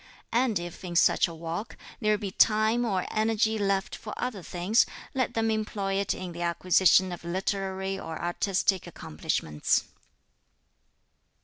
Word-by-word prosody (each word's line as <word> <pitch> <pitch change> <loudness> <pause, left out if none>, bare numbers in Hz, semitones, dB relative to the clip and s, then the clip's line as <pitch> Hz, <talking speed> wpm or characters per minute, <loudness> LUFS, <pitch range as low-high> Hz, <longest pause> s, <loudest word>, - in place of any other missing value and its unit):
And 235 -3 +2
if, 175 +1 -7
in 175 -2 -5
such - - +4
a 170 - -8
walk, 165 +7 -5 0.2
there 215 -2 +2
be 200 -2 -5
time 220 +4 +3
or 190 -5 0
energy 220 0 +1
left 195 -1 0
for 210 - -8
other 240 -6 -3
things, 180 +7 +2 0.3
let 260 -2 -1
them 225 0 +1
employ 210 -2 -2
it 195 0 0
in 185 -1 -6
the 170 0 -7
acquisition 185 +2 +4
of 175 - -7
literary 190 +2 -2
or 160 -4 -6
artistic 185 +1 0
accomplishments." 75 - -1
195 Hz, 140 wpm, -28 LUFS, 175-215 Hz, 0.3 s, such